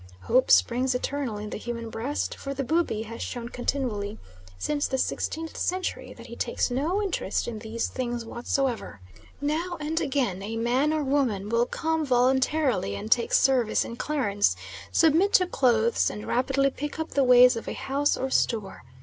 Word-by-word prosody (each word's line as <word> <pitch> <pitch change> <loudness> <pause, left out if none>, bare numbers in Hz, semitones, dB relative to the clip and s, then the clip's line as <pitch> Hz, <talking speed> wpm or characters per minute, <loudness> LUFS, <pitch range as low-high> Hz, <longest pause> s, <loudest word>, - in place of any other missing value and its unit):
Hope 255 - +2
springs 250 +2 +4
eternal 260 -3 -2
in 210 0 -6
the - - -4
human 230 -1 -5
breast, 265 +6 -2
for 275 0 -6
the 275 - -2
Bubi 305 -7 0
has 230 +1 -8
shown 235 -1 -5
continually 230 -5 -2 0.4
since 285 - -1
the 265 - -1
16th 320 +4 -2
century 370 +1 -2
that - - -13
he - - -9
takes - - -1
no 325 +11 0
interest 390 - -1
in 230 -2 -5
these 225 +1 -3
things 240 -2 -4
whatsoever. 240 - -2 0.4
Now 330 +5 -1
and 310 +2 -1
again 250 -9 -1
a 220 +3 -4
man 250 +6 +1
or 310 -1 0
woman 255 -8 0
will 235 +2 +2
come 320 0 -1
voluntarily 260 - +2
and 215 - -6
take 235 - +3
service 255 -5 +3
in 235 - -6
Clarence, 230 -8 0 0.4
submit 330 +5 +4
to 365 - +6
clothes, 235 -8 +2
and 210 - -7
rapidly 270 +2 +1
pick 295 +3 -5
up 320 - -3
the 280 - +2
ways 250 0 +7
of 230 - -6
a - - -3
house 285 +2 0
or 265 0 -3
store. 215 -7 0
255 Hz, 175 wpm, -26 LUFS, 230-290 Hz, 0.4 s, ways